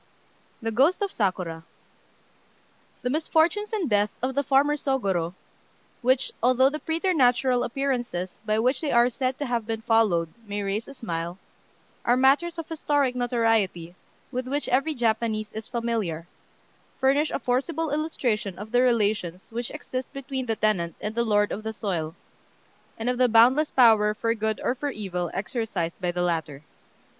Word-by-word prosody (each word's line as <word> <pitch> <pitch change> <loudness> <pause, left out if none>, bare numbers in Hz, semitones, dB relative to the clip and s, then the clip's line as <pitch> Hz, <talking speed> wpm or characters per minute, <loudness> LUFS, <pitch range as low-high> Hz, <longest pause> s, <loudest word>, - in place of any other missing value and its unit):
THE 225 - -1
GHOST 285 - +3
OF 400 - -2
SAKURA 180 -5 -2 1.4
The 250 - 0
misfortunes 325 +7 +1
and 410 -7 -1
death 205 -2 +2
of 260 +1 0
the 280 - +1
farmer 285 +2 +3
Sôgorô, 195 - -1 0.7
which, 255 +1 +2
although 255 +2 +4
the 305 - -4
preternatural 265 -8 +2
appearances 240 -9 -2
by 215 -1 0
which 250 +8 +1
they 305 - -1
are 240 +1 +4
said 255 +1 -2
to 290 - -3
have 235 -4 -2
been 225 -1 -3
followed 210 -8 +2
may 205 0 -3
raise 200 +3 -2
a 275 - -10
smile, 170 -6 -4 0.7
are 245 +1 +3
matters 285 +7 +3
of 330 - -5
historic 290 -5 0
notoriety 225 -8 0 0.4
with 255 0 -3
which 285 +3 -2
every 275 +5 +1
Japanese 220 -2 0
is 220 0 -6
familiar, 225 -9 -2 0.7
furnish 280 +3 +3
a - - -1
forcible 285 +5 -1
illustration 245 - -1
of 210 +2 -8
the 245 0 +4
relations 210 -7 0
which 240 +1 -3
exist 260 -4 -6
between 270 -1 -4
the 225 - +1
tenant 190 -6 0
and 210 - -4
the 235 - 0
lord 205 -2 +2
of 210 - -3
the 220 0 -4
soil, 175 -7 -3 0.8
and 225 - -4
of 250 0 0
the 250 -1 +4
boundless 250 +7 +5
power 220 -4 +5
for 230 +1 0
good 220 -1 -2
or - - +1
for 285 +3 -3
evil 180 -8 -3
exercised 195 -5 -3
by 180 -1 0
the 175 0 -1
latter. 160 -5 -2
235 Hz, 160 wpm, -26 LUFS, 205-270 Hz, 1.4 s, boundless